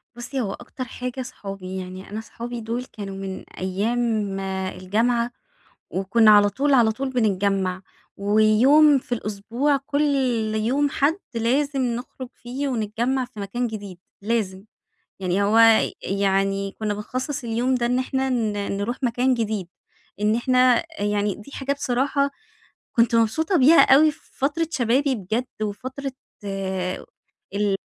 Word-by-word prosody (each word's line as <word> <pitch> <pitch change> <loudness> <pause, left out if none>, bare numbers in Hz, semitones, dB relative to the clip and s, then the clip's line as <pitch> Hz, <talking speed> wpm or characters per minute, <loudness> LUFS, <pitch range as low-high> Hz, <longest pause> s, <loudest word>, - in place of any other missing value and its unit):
بُصّي، 250 +2 -4
هو 195 -3 -2
أكتر 255 +1 -7
حاجة 250 +2 -5
صحابي، 195 -6 -7
يعني 185 +1 -7
أنا 215 +2 -4
صحابي 235 +1 -7
دول 235 +3 -3
كانوا 200 -4 -8
من 195 -1 -6 0.2
أيّام 205 +1 -1
الجامعة، 195 +5 -1 0.6
وكنّا 215 +4 +4
على 205 -1 +7
طول 275 +7 +1
على 230 -3 +5
طول 265 +3 -3
بنتجمّع، 195 -5 0 0.3
ويوم 220 +9 +5
في 250 - -11
الأسبوع 230 +7 -1
كل 280 +2 -2 0.5
يوم 265 +7 +1
حد 310 +7 +1 0.2
لازم 270 +5 +1
نخرُج 245 +1 -4
فيه 265 +4 -4
ونتجمّع 240 +3 -1
في 240 -4 -11
مكان 240 +5 -2
جديد، 205 -5 -7 0.2
لازم، 200 -3 -1 0.6
يعني 190 +2 0
هو 215 +3 +3 0.4
يعني 195 0 0
كنّا 210 -1 -1
بنخصّص 255 +6 -4
اليوم 240 +3 0
ده 240 -1 0
إن 250 +1 +1
إحنا 265 0 -1
ن 225 -4 0 0.2
نروح 230 +5 -2
مكان 250 +2 +2
جديد، 215 -6 -2 0.5
إن 210 +1 +3
إحنا 255 +1 +4
أ 325 -10 -5
يعني 205 -1 0
دي 215 +7 -13
حاجة 275 +1 -1
بصراحة 280 +1 0 0.6
كنت 230 0 +3
مبسوطة 315 - +2
بيها 300 +6 +7
أوي 305 +2 +6
في - - -21
فترة 300 +4 0
شبابي 260 +2 +1
بجد، 220 +5 -2 0.2
وفترة 260 +6 -4 0.3
آآ 190 -2 -3 0.5
ال 205 -1 +1
230 Hz, 140 wpm, -23 LUFS, 200-260 Hz, 0.6 s, على